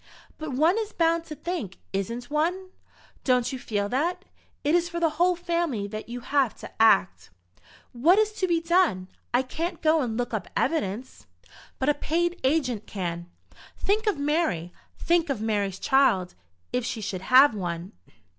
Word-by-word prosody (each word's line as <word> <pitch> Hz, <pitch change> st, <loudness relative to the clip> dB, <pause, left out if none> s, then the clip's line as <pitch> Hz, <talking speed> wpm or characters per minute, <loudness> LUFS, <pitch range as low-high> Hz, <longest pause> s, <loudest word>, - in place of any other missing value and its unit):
"But 310 Hz, -3 st, -5 dB
one 325 Hz, -, +3 dB
is 440 Hz, -1 st, -4 dB
bound 335 Hz, 0 st, +1 dB
to 310 Hz, -, -7 dB
think, 290 Hz, -, -5 dB, 0.2 s
isn't 230 Hz, +7 st, -3 dB
one? 360 Hz, +5 st, -1 dB, 0.5 s
Don't 250 Hz, -1 st, +2 dB
you 260 Hz, -, -4 dB
feel 205 Hz, -4 st, -2 dB
that? 345 Hz, -, -1 dB, 0.4 s
It 295 Hz, -, +2 dB
is 345 Hz, 0 st, +2 dB
for 340 Hz, 0 st, -4 dB
the 330 Hz, -2 st, +2 dB
whole 360 Hz, 0 st, +4 dB
family 335 Hz, -, -1 dB
that 215 Hz, +2 st, -7 dB
you 245 Hz, +1 st, -5 dB
have 270 Hz, -1 st, +1 dB
to -, -, -8 dB
act." 200 Hz, -4 st, +4 dB, 0.6 s
"What 315 Hz, +11 st, +4 dB
is 430 Hz, 0 st, +3 dB
to 370 Hz, -, +1 dB
be 340 Hz, -2 st, +2 dB
done? 330 Hz, -, +2 dB, 0.2 s
I 245 Hz, +2 st, +2 dB
can't 325 Hz, +7 st, -4 dB
go 315 Hz, 0 st, +3 dB
and 230 Hz, -4 st, -2 dB
look 245 Hz, 0 st, -2 dB
up -, -, -2 dB
evidence." 250 Hz, -5 st, -2 dB, 0.5 s
"But 265 Hz, -, -2 dB
a -, -, +5 dB
paid 345 Hz, +4 st, -1 dB
agent 260 Hz, -6 st, 0 dB
can. 175 Hz, -3 st, -4 dB, 0.5 s
Think 430 Hz, +2 st, 0 dB
of 415 Hz, -, +2 dB
Mary. 285 Hz, -, 0 dB, 0.2 s
Think 340 Hz, -1 st, +1 dB
of 270 Hz, -6 st, -1 dB
Mary's 205 Hz, -3 st, -1 dB
child, 230 Hz, -10 st, +2 dB, 0.4 s
if 250 Hz, -, 0 dB
she 230 Hz, -, -3 dB
should 190 Hz, -3 st, -4 dB
have 260 Hz, +6 st, +6 dB
one." 175 Hz, -3 st, -4 dB
275 Hz, 170 wpm, -26 LUFS, 215-340 Hz, 0.6 s, have